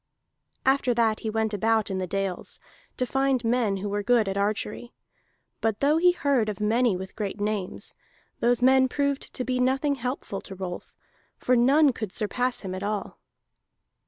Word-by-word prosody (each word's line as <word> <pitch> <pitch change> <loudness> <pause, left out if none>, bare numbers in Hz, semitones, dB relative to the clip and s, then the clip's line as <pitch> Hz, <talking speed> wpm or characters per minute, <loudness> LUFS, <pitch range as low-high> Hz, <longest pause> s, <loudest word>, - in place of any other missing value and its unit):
After 265 -2 +3
that 225 -2 +2
he 220 - -3
went 220 0 -1
about 220 +1 +1
in 190 - -2
the 185 - -2
dales, 195 0 -3 0.4
to 255 - 0
find 270 0 +1
men 225 -4 +1
who 200 +2 -4
were 205 +1 -1
good 235 -1 +3
at 195 - -2
archery; 210 +3 -2 0.7
but 220 -2 0
though 295 +3 +3
he 355 +2 +5
heard 280 -10 +1
of 205 - -5
many 220 -1 +2
with 190 +1 -8
great 205 -1 -4
names, 205 -3 -3 0.5
those 245 +1 +2
men 260 0 +6
proved 280 +1 -1
to 255 - -2
be 255 0 -1
nothing 265 +3 +2
helpful 250 -6 -4
to 195 - -10
Rolf, 180 -2 -6 0.5
for 250 - +2
none 275 +4 +5
could 215 -4 -5
surpass 245 +5 -1
him 190 -2 -5
at 185 - -5
all. 205 0 -3
225 Hz, 175 wpm, -26 LUFS, 205-255 Hz, 0.7 s, men